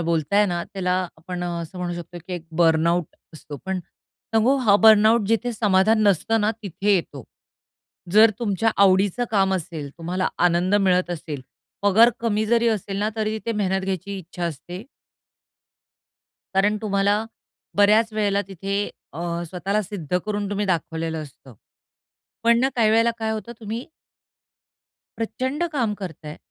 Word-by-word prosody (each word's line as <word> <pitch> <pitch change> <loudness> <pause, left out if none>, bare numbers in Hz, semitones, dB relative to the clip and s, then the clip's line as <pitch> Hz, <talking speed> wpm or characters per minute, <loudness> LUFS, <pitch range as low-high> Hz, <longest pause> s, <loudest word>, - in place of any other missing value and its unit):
बोलताय 170 +5 +2
ना 175 -2 -2
त्याला 180 -2 -2 0.2
आपण 175 +2 -6
असं 170 0 -5
म्हणू 175 -1 -3
शकतो, 175 0 -8
की 185 - -7
एक 170 - -7 0.2
बर्नआउट 165 +1 +3 0.3
असतो. 150 -1 -9
पण 190 0 -2 0.6
सांगू 240 +5 +4
हा 225 -7 +3
बर्नआउट 220 0 +6
जिथे 230 +2 +1
समाधान 215 0 +3
नसतं 210 +3 +2
ना 210 +1 +2
तिथे 200 +2 0
येतो. 145 - -3 0.9
जर 220 +1 +7
तुमच्या 225 -1 +1
आवडीचं 195 +4 +3
काम 195 -3 +2
असेल, 160 -4 -5
तुम्हाला 180 +3 -1 0.2
आनंद 180 +3 +2
मिळत 185 -3 +2
असेल, 155 -4 -5 0.4
पगार 220 +4 +6
कमी 220 -2 0
जरी 235 +1 +3
असेल 200 -3 -2
ना 210 +1 0
तरी 215 0 -1
तिथे 230 +1 -3
मेहनत 190 -2 0
घ्यायची 195 +1 -4
इच्छा 175 0 -6
असते 170 +4 -6 1.7
कारण 205 +2 +3
तुम्हाला 205 +1 +1 0.5
बऱ्याच 215 +2 +4
वेळेला 205 -2 +1
तिथे 195 +2 -2 0.2
अ, 150 - -9 0.3
स्वतःला 195 +4 -1
सिद्ध 180 -4 -3
करून 205 -1 -2
तुम्ही 205 0 -1
दाखवलेलं 165 -2 -2
असतं. 135 -3 -14 0.9
पण 235 0 +4
ना 265 - +3
काही 220 -3 +4
वेळेला 230 +1 +4
काय 220 -1 -2
होतं 220 +2 -5
तुम्ही 225 +3 -5 1.3
प्रचंड 260 +7 -2
काम 235 -7 0
करताय 160 -6 -8
200 Hz, 145 wpm, -23 LUFS, 175-215 Hz, 1.7 s, जर